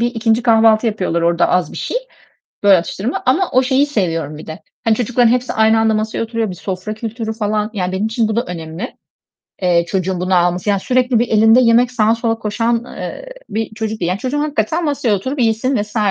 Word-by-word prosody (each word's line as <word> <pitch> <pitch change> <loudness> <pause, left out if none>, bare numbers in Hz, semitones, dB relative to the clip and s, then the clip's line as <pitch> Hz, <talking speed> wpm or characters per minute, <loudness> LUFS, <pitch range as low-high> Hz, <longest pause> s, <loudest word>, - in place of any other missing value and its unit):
bir 235 - +2
2'nci 230 -1 0
kahvaltı 225 -1 +4
yapıyorlar 185 -6 -1
orada 170 0 +2
az 180 -4 0
bir - - -9
şey, - - -3 0.7
böyle, 200 -2 +7
atıştırma 195 +8 -3
ama 340 +9 +2
o 255 - +4
şeyi 265 +2 +2
seviyorum 165 - -2
bir 155 - -11
de. 160 +4 -8 0.2
Hani, 225 -1 +3
çocukların 245 +1 +2
hepsi 250 0 0
aynı 220 0 +3
anda 220 0 +2
masaya 215 +1 -2
oturuyor, 230 -2 -2
bir 180 - -6
sofra 185 +3 -5
kültürü 220 0 -5
falan, 210 -1 -1
yani 185 -3 -2
benim 190 +3 -1
için 225 0 0
bu 220 - -2
da 235 - +1
önemli, 170 - -7 0.7
eee, 170 -1 +3
çocuğun 185 -1 -1
bunu 185 +1 0
alması, 175 +2 +1
yani 200 -1 +1
sürekli 250 0 +1
bir 240 - 0
elinde 225 +3 +5
yemek, 240 +1 +4
sağa 225 -2 +2
sola 230 -1 -1
koşan, 230 +2 -1
eee, - - -7 0.2
bir 220 0 -4
çocuk 220 -1 -4
değil. 170 - -1
Yani, 185 +2 -1
çocuğum 260 +4 -2
hakikaten 300 +3 -1
masaya 280 -7 0
oturup 260 +8 -3
yesin 235 +4 +1
vs. 210 +2 -10
220 Hz, 210 wpm, -17 LUFS, 190-240 Hz, 0.7 s, böyle